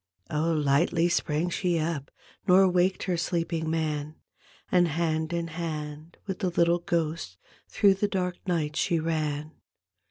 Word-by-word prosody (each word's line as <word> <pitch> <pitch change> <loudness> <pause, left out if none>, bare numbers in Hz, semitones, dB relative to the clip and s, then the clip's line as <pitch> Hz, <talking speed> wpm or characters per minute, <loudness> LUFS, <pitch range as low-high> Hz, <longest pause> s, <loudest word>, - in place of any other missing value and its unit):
Oh, 155 +2 +1
lightly 155 +3 +2
sprang 170 0 0
she 175 -1 0
up 155 -3 -2 0.4
Nor 190 +1 +7
waked 180 +1 +2
her 180 -2 0
sleeping 165 -2 -1
man, 155 -2 -2 0.6
And 175 -1 +4
hand 160 0 -1
in 170 -1 -2
hand 155 -1 -5
with 190 -2 -4
the 185 - 0
little 170 0 +3
ghost 165 - -2 0.3
Through 200 -1 +4
the 195 +2 0
dark 180 -3 -2
night 155 -4 0
she 170 - +1
ran. 155 -2 -2
165 Hz, 145 wpm, -27 LUFS, 155-175 Hz, 0.6 s, Nor